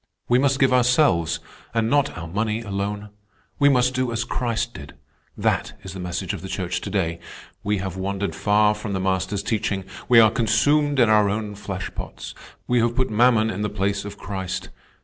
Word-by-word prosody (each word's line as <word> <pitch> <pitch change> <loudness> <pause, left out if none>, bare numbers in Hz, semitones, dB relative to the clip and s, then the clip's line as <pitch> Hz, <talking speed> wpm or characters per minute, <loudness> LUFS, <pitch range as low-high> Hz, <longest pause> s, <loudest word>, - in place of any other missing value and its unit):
"We 120 +1 +4
must 135 0 +2
give 135 -2 +4
ourselves 125 - +3 0.4
and 115 -1 +2
not 145 0 +1
our 85 -1 -6
money 105 +5 -1
alone. 105 0 -4 0.5
We 145 0 +6
must 125 -2 +3
do 130 -1 -1
as 115 0 -1
Christ 120 0 -2
did; 70 -6 -10 0.4
that - - 0
is 95 -1 -7
the 95 - -7
message 90 0 -3
of - - -6
the 95 - -7
Church 90 -1 -3
today. 90 -5 -2 0.4
We 105 +1 0
have 95 -1 -4
wandered 100 +1 -2
far 105 0 +3
from 105 -1 -5
the 95 - -1
Master's 95 +1 -1
teaching. 100 -3 -1 0.3
We 120 -2 +8
are 110 -2 +7
consumed 140 +6 +2
in 120 - +6
our 105 -2 +4
own 105 0 -3
flesh 100 -2 -6
pots. - - -7 0.3
We 125 0 +2
have 120 0 +1
put 130 -2 0
mammon 110 0 +4
in 95 - -4
the 105 - 0
place 100 0 -1
of 100 - -8
Christ. 95 -3 -5
105 Hz, 190 wpm, -23 LUFS, 95-120 Hz, 0.5 s, We